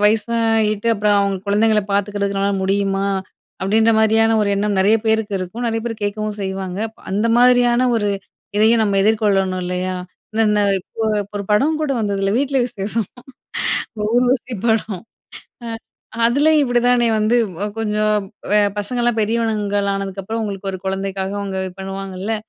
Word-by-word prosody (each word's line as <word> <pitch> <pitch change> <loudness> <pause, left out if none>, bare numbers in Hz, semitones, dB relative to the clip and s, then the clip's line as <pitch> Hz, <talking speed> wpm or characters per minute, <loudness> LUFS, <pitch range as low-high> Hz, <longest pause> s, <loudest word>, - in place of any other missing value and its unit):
வயசாயிட்டு 220 0 +2
அப்புறம் 210 0 +2
அவுங்க 200 -1 0
குழந்தைங்கள 210 +1 +3
பார்த்துக்கிறதுக்கு 200 0 -1
உன்னால 200 0 +1
முடியுமா? 195 0 0 0.5
அப்பிடின்ற 220 +4 +3
மாதிரியான 225 +1 +3
ஒரு 205 - 0
எண்ணம் 200 0 0
நிறைய 210 +4 +4
பேருக்கு 220 -2 +1
இருக்கும். 185 +7 -5
நிறைய 225 -1 -1
பேரு 230 -1 -3
கேட்கவும் 210 +1 -3
செய்வாங்க. 190 -1 -4 0.3
அந்த 210 +4 +1
மாதிரியான 245 0 +4
ஒரு 205 -2 0 0.5
இதையும் 220 +1 +4
நம்ம 200 -1 0
எதிர்கொள்ளணும் 195 -4 +1
இல்லயா? 180 +1 -2 0.4
இந்த 225 0 +2
ந - - +3 0.4
கோ 225 - -2 0.2
இப்ப 200 - -17
ஒரு 200 - -4
படம் 275 +10 +3
கூட 305 - -1
வந்தது 200 -2 -1
இல்ல. 195 - +1
"வீட்ல 275 0 0
விசேஷம்" 210 -1 -3 1.1
ஊர்வசி 250 +1 +1
படம். 215 -4 0 0.6
அ 230 - -5 0.6
அதுலயும் 295 +6 +4
இப்பிடி 245 -3 +2
தானே 240 -1 +4
வந்து 215 +3 +2 0.3
அ - - +1
கொஞ்சம் 215 -1 +1 0.4
வெ 210 - +5 0.2
பசங்கள்லாம் 235 +2 0
பெரியவணுங்களா 210 -2 0
ஆனதுக்கப்புறம் 195 +3 -4
உங்களுக்கு 195 -1 -4
ஒரு 190 - -5
குழந்தைக்காக 195 0 -2
அவுங்க 195 -1 -4
இது 185 - -6
பண்ணுவாங்கல்ல. 195 +2 -4
210 Hz, 145 wpm, -19 LUFS, 195-225 Hz, 1.1 s, வெ